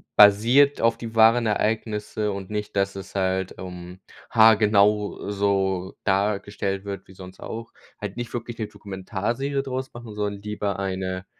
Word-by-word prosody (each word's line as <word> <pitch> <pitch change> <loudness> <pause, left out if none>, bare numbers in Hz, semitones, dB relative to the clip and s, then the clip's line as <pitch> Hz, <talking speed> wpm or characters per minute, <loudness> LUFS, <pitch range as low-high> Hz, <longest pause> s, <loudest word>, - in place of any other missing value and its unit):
basiert 115 +8 +6
auf 115 0 +3
die 115 -1 -7
wahren 115 +1 +5
Ereignisse 105 0 -1
und 100 -1 -6
nicht, 105 -1 -4
dass 100 0 0
es 95 0 -9
halt, 95 -1 0
ähm, 90 0 -8 0.3
haargenau 105 -2 +4
so 95 -2 0
dargestellt 100 0 -1
wird 100 -2 -6
wie 95 - -14
sonst 95 0 -12
auch. 115 +1 -7 0.3
Halt 105 -1 -6
nicht 120 -1 -5
wirklich 120 -1 -5
'ne 110 - -2
Dokumentarserie 110 +9 -3
draus 130 -1 -4
machen, 120 -2 -9
sondern 105 -1 -3
lieber 105 -1 -3
eine, 95 -1 -3
105 Hz, 145 wpm, -24 LUFS, 95-115 Hz, 0.3 s, basiert